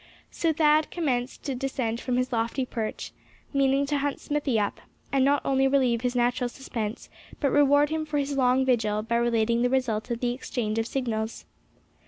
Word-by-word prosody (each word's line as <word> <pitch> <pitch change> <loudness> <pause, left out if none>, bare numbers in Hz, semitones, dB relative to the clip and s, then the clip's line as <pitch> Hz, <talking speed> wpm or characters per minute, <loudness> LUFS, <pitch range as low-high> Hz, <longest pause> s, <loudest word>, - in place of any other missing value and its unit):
So 330 - 0
Thad 305 0 +3
commenced 260 -7 -2
to 275 - -2
descend 250 -3 -2
from 250 -1 -1
his 255 0 -1
lofty 230 +3 0
perch, 225 -3 -4 0.4
meaning 275 0 +3
to 285 0 0
hunt 285 0 -2
Smithy 285 -6 0
up, 205 - -2 0.3
and 270 -1 +3
not 285 +1 +3
only 270 0 +3
relieve 255 -4 +2
his 250 0 -1
natural 245 0 +1
suspense, 230 -4 -5 0.3
but 280 -3 +1
reward 285 0 +4
him 315 0 -2
for 300 -1 -1
his 280 0 -1
long 260 0 +3
vigil 215 -4 +1
by 235 +1 0
relating 235 0 +1
the 245 - +2
result 250 -3 0
of 235 -1 -2
the 245 -1 0
exchange 225 -3 -3
of 225 - -1
signals. 230 -4 -3
255 Hz, 185 wpm, -26 LUFS, 235-275 Hz, 0.4 s, reward